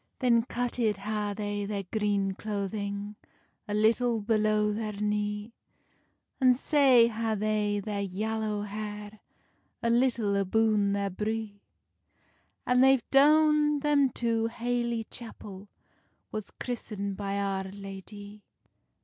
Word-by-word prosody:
Then 240 -3 +3
cutted 240 -3 -1
ha 210 0 -3
they 205 -1 -3
their 200 -1 -3
green 200 0 0
cloathing, 200 0 -4 0.5
A 205 - -2
little 225 +2 +2
below 215 -1 +1
their 215 0 -3
knee; 210 +1 -2 0.9
And 255 -2 +5
sae 270 -5 +5
ha 225 -1 -1
they 210 0 0
their 205 0 -3
yallow 210 +2 -2
hair, 210 0 -6 0.6
A 235 - +2
little 235 -4 +2
aboon 205 +1 +2
there 200 -1 -1
bree; 210 +1 -4 1.0
And 250 +1 +4
they've 265 -2 +4
doen 300 +1 +5
them 285 -2 +3
to 230 -1 0
haely 235 0 -2
chapel 205 -4 -9 0.6
Was 215 -2 -5
christened 205 -5 -5
by 200 0 -3
Our 195 -1 -1
Ladye. 200 +1 -9
215 Hz, 115 wpm, -28 LUFS, 205-235 Hz, 1.0 s, And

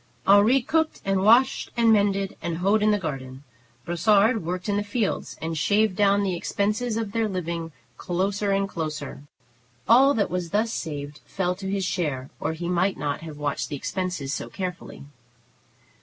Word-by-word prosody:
Henri 210 +6 +5
cooked 320 +4 0
and 195 -1 +1
washed 240 +6 +4
and 230 -1 +5
mended, 200 -2 +1
and 170 -1 -3
hoed 200 +4 +2
in 215 - +3
the 210 - +3
garden. 135 -6 -6 0.4
Brossard 205 +5 +3
worked 180 +3 -4
in 205 -1 +1
the 205 - 0
fields 205 0 -2
and 165 0 -2
shaved 205 +5 +2
down 200 0 +3
the 190 -2 -1
expenses 215 +6 -1
of 225 -3 -3
their 225 0 0
living 170 -3 -4 0.3
closer 195 +3 -1
and 195 0 +1
closer. 155 -7 -5 0.7
All 270 +5 +6
that 205 - 0
was 180 -2 -2
thus 220 +5 0
saved 145 -2 -5
fell 180 -2 -1
to 190 +1 -6
his 195 -1 -1
share, 145 -9 -2
or - - -2
he 170 +2 -5
might 180 +2 +1
not 145 +1 -3
have 160 -2 -8
watched 145 -1 -2
the 150 - -3
expenses 180 -3 -3
so - - -4
carefully. 180 -6 -6
190 Hz, 170 wpm, -25 LUFS, 165-210 Hz, 0.7 s, All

